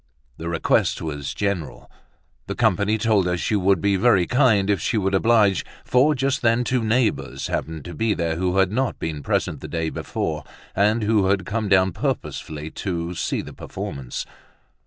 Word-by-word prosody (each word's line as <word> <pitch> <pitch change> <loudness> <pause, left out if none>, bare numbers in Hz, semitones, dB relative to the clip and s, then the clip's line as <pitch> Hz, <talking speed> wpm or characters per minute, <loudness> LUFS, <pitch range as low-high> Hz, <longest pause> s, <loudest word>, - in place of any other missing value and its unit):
The 85 +1 -5
request 85 -1 +1
was 70 -3 -4
general! 100 -6 -3 0.6
The - - -3
company 105 -1 +2
told 105 -4 +2
her 90 0 0
she 105 - -1
would 95 -2 +3
be 100 -1 +2
very 100 -4 +4
kind 120 -6 +3
if 100 -4 +1
she 115 - 0
would 95 -1 0
oblige, 105 -1 +3 0.2
for 140 +5 +3
just 135 +1 0
then 115 +1 +3
two 125 -1 0
neighbors 115 +1 0
happened 80 -2 -3
to 85 - -7
be 110 +6 0
there 85 -1 -1
who 90 +2 0
had 95 -1 +3
not 130 +3 -1
been 80 -3 -4
present - - -1
the - - -6
day 80 -1 -2
before, 75 -1 -3 0.3
and 105 +3 +2
who 105 -2 +2
had 95 -1 +1
come 105 0 -2
down 95 -1 +4
purposely 75 -2 -4
to 85 -2 -3
see - - -2
the - - -10
performance. 65 -3 -6
100 Hz, 180 wpm, -23 LUFS, 85-110 Hz, 0.6 s, very